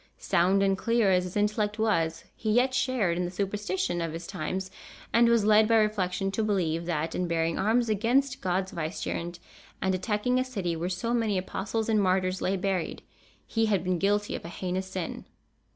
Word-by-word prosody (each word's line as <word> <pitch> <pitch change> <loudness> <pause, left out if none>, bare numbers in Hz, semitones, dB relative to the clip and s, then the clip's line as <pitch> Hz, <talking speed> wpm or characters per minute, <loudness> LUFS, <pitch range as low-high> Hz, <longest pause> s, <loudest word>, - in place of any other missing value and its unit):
Sound 190 +2 +2
and 195 -1 +3
clear 230 -1 +2
as 180 -1 +3
his 180 +2 -5
intellect 210 +1 0
was, 165 -7 0
he 220 - -3
yet 250 +4 +3
shared 245 -9 +1
in 180 - 0
the - - -3
superstition 190 -2 -2
of 165 -1 -3
his 165 +1 -6
times, 185 +1 -4 0.4
and 235 0 +5
was 230 -3 +3
led 215 0 +6
by 230 - +4
reflection 195 -3 +1
to 220 +3 -1
believe 170 -5 0
that, 160 -1 -1
in 180 - -1
bearing 165 -1 0
arms 230 +4 +2
against 245 +6 +1
God's 185 +1 -1
vicegerent, 170 +1 -4 0.4
and 190 0 0
attacking 210 +7 0
a - - +2
city 195 -10 -3
where 170 +2 -2
so 190 +6 -2
many 225 -4 +1
apostles 200 +4 -2
and 215 -2 +3
martyrs 185 0 +1
lay 195 +1 0
buried, 190 -2 -2 0.4
he 225 -1 0
had 200 -5 +1
been 180 -1 0
guilty 205 +2 +1
of - - -6
a 170 - -7
heinous 185 +1 -3
sin. 190 -2 -5
195 Hz, 190 wpm, -28 LUFS, 180-215 Hz, 0.4 s, led